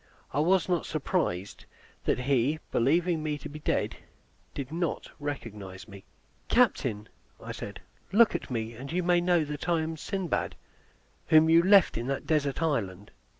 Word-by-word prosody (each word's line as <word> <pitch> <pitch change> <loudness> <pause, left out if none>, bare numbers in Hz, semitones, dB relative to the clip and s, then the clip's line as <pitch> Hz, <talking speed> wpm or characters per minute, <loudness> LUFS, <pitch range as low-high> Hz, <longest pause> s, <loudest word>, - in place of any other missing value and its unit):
I 145 - +1
was 180 +3 +3
not 175 -3 0
surprised 135 - -2 0.4
that - - +1
he, 135 +3 +2
believing 165 +6 +2
me 150 -1 -2
to - - -8
be 150 +1 -9
dead, - - -1 0.6
did 140 -1 -5
not 170 -1 -3
recognize 105 -10 -6
me. 100 -2 -12 0.4
"Captain," 105 0 +2 0.4
said - - -7 0.3
I, 200 - -2
"look 235 -1 +7
at - - -4
me, 115 -2 -3
and 130 +5 -8
you 180 +2 0
may 175 0 +3
know 175 -3 +2
that 150 +4 -5
I 170 -2 +3
am 160 +1 -3
Sindbad, 190 +1 -2 0.7
whom 160 0 +6
you 165 +1 +7
left 190 - +5
in 120 - -4
that 135 0 -2
desert 150 -1 0
island." 105 - -2
150 Hz, 160 wpm, -28 LUFS, 120-170 Hz, 0.7 s, look